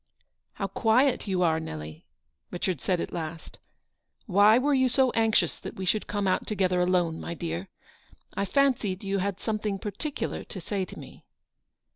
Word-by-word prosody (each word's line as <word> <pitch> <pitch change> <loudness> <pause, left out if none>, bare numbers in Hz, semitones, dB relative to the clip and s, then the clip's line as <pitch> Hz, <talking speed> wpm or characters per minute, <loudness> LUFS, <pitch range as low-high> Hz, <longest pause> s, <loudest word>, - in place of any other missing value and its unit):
" - - -54
How 195 - -3
quiet 225 +6 +2
you 185 -2 +1
are, 160 -2 +3
Nelly," 80 - -7 0.4
Richard 180 -3 -2
said 180 -2 0
at - - -4
last; 165 -1 -6 0.3
" - - -53 0.3
why 205 +3 +6
were 285 +3 +2
you 260 -1 +3
so 260 +1 +3
anxious 225 -1 +2
that - - -8
we 190 - -4
should 210 +4 0
come 205 -1 -1
out 185 - +1
together 185 -4 +1
alone, 180 -3 +1
my 170 - -5
dear? 85 - -4 0.7
I 200 - 0
fancied 235 -7 +1
you 195 0 -1
had 195 0 -2
something 215 -2 -2
particular 220 +9 -4
to 190 - -8
say 190 +2 -2
to - - -12
me." - - -12
195 Hz, 175 wpm, -27 LUFS, 175-220 Hz, 0.7 s, why